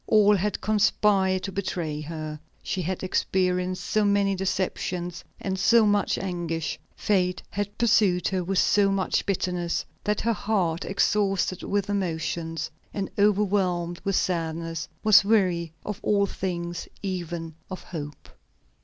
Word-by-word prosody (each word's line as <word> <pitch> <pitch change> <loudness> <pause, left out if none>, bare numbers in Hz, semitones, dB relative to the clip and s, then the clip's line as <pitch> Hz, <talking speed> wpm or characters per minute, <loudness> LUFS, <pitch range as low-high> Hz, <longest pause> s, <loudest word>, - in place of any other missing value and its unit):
All 210 -1 +5
had 200 +1 -1
conspired 200 -3 +2
to 195 - -3
betray 175 -6 -3
her. 155 -1 -6 0.2
She 190 - -2
had 185 +2 -3
experienced 185 -1 0
so 215 - +2
many 200 -1 +3
deceptions 180 -2 -2 0.2
and 190 -1 -3
so 230 +3 +5
much 205 -1 +2
anguish; 170 -4 -3 0.2
fate 180 -3 +1
had 205 +1 -3
pursued 210 -6 +3
her 185 -2 -1
with 190 +2 -1
so 200 +1 +4
much 195 -1 +1
bitterness, 180 -3 -1 0.2
that 210 0 0
her 230 +1 +1
heart, 190 -6 0
exhausted 195 -2 +1
with 200 -1 -1
emotions, 165 -4 -2 0.2
and 195 -2 -3
overwhelmed 190 -4 +2
with 195 -1 0
sadness, 165 -2 -1 0.2
was 210 -3 +7
weary 185 -6 +2
of 210 0 -4
all 200 -1 +3
things, 175 -3 -4 0.2
even 175 -4 -4 0.2
of 185 - -7
hope. 150 -4 -7
185 Hz, 135 wpm, -26 LUFS, 175-200 Hz, 0.2 s, was